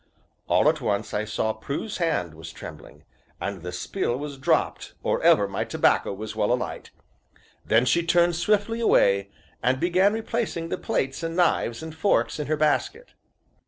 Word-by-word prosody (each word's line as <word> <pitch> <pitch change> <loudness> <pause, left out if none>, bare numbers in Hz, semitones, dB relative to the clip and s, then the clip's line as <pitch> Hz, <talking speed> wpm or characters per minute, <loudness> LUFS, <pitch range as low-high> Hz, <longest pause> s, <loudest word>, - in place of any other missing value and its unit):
All - - +3
at - - +2
once - - -1
I 105 +1 -1
saw 110 0 -1
Prue's 140 - -5
hand 160 - -1
was 80 +1 -9
trembling, - - -11 0.4
and 100 -2 -4
the 90 +1 -5
spill 120 - -2
was 140 -1 -6
dropped 135 - 0
or - - 0
ever 100 - +5
my 100 - -2
tobacco - - +2
was 105 +2 -6
well 105 0 +1
alight; 125 - -3 0.7
then 115 +3 +3
she 170 +7 +3
turned 170 0 +3
swiftly 210 +5 +1
away, 100 - +3 0.3
and 130 +2 +1
began 185 +5 +3
replacing 220 -7 -2
the - - -3
plates 135 +4 -2
and 165 0 -3
knives 160 -7 +1
and 160 -1 -7
forks 160 -1 +1
in 150 - -3
her 155 +1 0
basket. 155 - 0
150 Hz, 165 wpm, -25 LUFS, 110-175 Hz, 0.7 s, ever